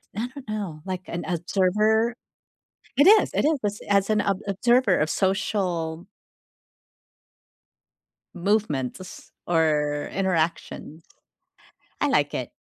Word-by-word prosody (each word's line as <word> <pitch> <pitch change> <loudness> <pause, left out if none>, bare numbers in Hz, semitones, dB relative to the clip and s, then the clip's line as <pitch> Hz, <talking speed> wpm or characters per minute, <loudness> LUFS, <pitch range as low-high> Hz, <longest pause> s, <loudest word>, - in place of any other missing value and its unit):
I 230 +4 -2
don't 275 -5 -11
know, 200 -8 -4
like 185 -1 -4
an 175 - -4
observer? 210 +6 +1 0.8
It 285 - +6
is, 430 +1 +6
it - - +1
is, 305 -3 +2
as 205 0 -2
as 200 0 +3
an 215 -1 +2
ob 195 -1 0
observer 235 +1 +3
of 155 +1 0
social 185 -4 -1 2.3
movement 180 - 0
to - - -12
s 185 - -12 0.2
or 150 -3 +1
interactions. 165 -3 -2 0.9
I - - +2
like - - +1
it. - - -4
190 Hz, 120 wpm, -24 LUFS, 165-215 Hz, 2.3 s, It